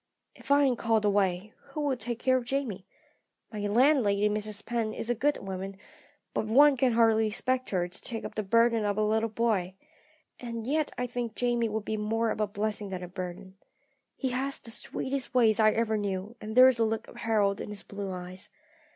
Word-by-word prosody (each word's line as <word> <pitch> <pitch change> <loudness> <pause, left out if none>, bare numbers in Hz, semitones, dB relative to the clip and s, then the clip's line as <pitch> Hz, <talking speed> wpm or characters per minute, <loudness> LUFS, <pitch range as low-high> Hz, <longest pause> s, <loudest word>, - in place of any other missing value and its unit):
"If - - -15
I 285 0 +5
am 260 -3 +3
called 225 -2 +1
away, 200 0 +1
who 305 - -6
will 285 -3 +1
take 240 0 -4
care 255 +2 +2
of 255 - 0
Jamie? 235 -7 -3 0.7
My 210 - -4
landlady, 215 -3 +3
Mrs. 210 0 -3
Penn, 230 -2 -2
is 235 - -2
a - - +3
good 285 +6 +1
woman, 195 0 -6 0.6
but 215 - -1
one 280 +6 +6
can 255 -1 +2
hardly 225 -1 +4
expect 255 +4 -1
her 180 -3 0
to 180 - -11
take 225 -2 -4
up - - -6
the 215 - -2
burden 230 +2 +3
of 205 -1 0
a 215 - +2
little 220 +1 +1
boy. 210 -5 0 0.6
And 230 -2 -5
yet 300 +3 +1
I 250 - -1
think 240 -2 -4
Jamie 240 -2 +1
would 215 0 -3
be 220 - -2
more 225 +2 0
of - - -3
a 210 - +1
blessing 210 0 -3
than 185 -1 -5
a - - -5
burden. 185 +1 -7 0.6
He 265 - -2
has 270 +2 -1
the 230 - -7
sweetest 260 +3 -3
ways 225 -3 +4
I 215 -1 +6
ever 225 -1 +1
knew, 200 +2 -3
and 215 +1 -6
there 255 +1 +9
is 255 -3 +2
a - - +4
look 220 0 -1
of - - -13
Harold 205 -3 +1
in - - -6
his 210 -1 -6
blue 200 -1 -6
eyes. 180 +1 -6
220 Hz, 210 wpm, -29 LUFS, 205-240 Hz, 0.7 s, there